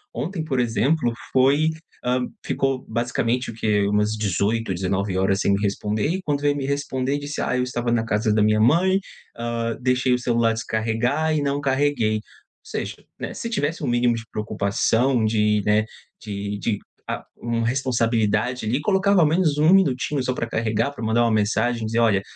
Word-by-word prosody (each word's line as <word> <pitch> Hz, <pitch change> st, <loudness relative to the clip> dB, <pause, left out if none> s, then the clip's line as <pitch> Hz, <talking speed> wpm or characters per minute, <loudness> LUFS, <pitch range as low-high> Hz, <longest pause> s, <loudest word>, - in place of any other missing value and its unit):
Ontem, 160 Hz, +7 st, -3 dB
por 135 Hz, -5 st, -1 dB
exemplo, 120 Hz, +3 st, +1 dB, 0.2 s
foi, 140 Hz, +4 st, +4 dB, 0.4 s
ah, 125 Hz, +1 st, +2 dB, 0.3 s
ficou 135 Hz, -1 st, -1 dB
basicamente 120 Hz, +2 st, -1 dB
o -, -, -11 dB
que 105 Hz, -2 st, +1 dB
umas 105 Hz, +1 st, +1 dB
18h, 105 Hz, +2 st, 0 dB
19h 95 Hz, +1 st, 0 dB
sem 100 Hz, -, +2 dB
me 100 Hz, -, +2 dB
responder. 105 Hz, +2 st, -1 dB
E 185 Hz, +5 st, -1 dB
quando 145 Hz, -3 st, -1 dB
veio 145 Hz, 0 st, +2 dB
me 140 Hz, -2 st, -3 dB
responder, 140 Hz, -1 st, -1 dB
disse: 145 Hz, +1 st, -4 dB
"Ah, 125 Hz, -, 0 dB
eu 125 Hz, -, +1 dB
estava 120 Hz, -1 st, -2 dB
na 115 Hz, -1 st, +1 dB
casa 110 Hz, 0 st, +1 dB
da 105 Hz, -, +3 dB
minha 110 Hz, 0 st, +3 dB
mãe. 180 Hz, -, +4 dB, 0.4 s
Ah, 115 Hz, -1 st, -2 dB
deixei 125 Hz, 0 st, +2 dB
o 125 Hz, -, +1 dB
celular 115 Hz, -2 st, +1 dB
descarregar 115 Hz, +8 st, 0 dB
e 150 Hz, -, +1 dB
não 140 Hz, 0 st, 0 dB
carreguei.". 135 Hz, -5 st, +1 dB, 0.5 s
Ou -, -, -14 dB
seja, -, -, -4 dB, 0.2 s
né, -, -, -5 dB
se 230 Hz, -, -5 dB
tivesse 165 Hz, -7 st, -2 dB
um 140 Hz, -, -1 dB
mínimo 120 Hz, 0 st, +2 dB
de 115 Hz, -, -5 dB
preocupação 110 Hz, +4 st, +1 dB
de, 105 Hz, -1 st, +2 dB
né, 105 Hz, +1 st, +3 dB, 0.4 s
de 100 Hz, -1 st, -4 dB
de 105 Hz, 0 st, -1 dB, 0.3 s
a -, -, -4 dB
uma 115 Hz, -1 st, -2 dB
responsabilidade 120 Hz, -2 st, 0 dB
ali, 120 Hz, +5 st, 0 dB
colocava 195 Hz, +3 st, +2 dB
ao 160 Hz, -, +5 dB
menos 155 Hz, -2 st, +2 dB
1 155 Hz, +4 st, +5 dB
minutinho 145 Hz, -6 st, +2 dB
só 130 Hz, -, 0 dB
para 115 Hz, -, -3 dB
carregar, 115 Hz, +1 st, 0 dB
pra 140 Hz, -, -8 dB
mandar 110 Hz, +2 st, +2 dB
uma 115 Hz, -, +2 dB
mensagem 110 Hz, +2 st, +1 dB
e -, -, -1 dB
dizer: 115 Hz, +2 st, 0 dB
"Olha, 105 Hz, -4 st, +3 dB
120 Hz, 185 wpm, -23 LUFS, 110-140 Hz, 0.5 s, ao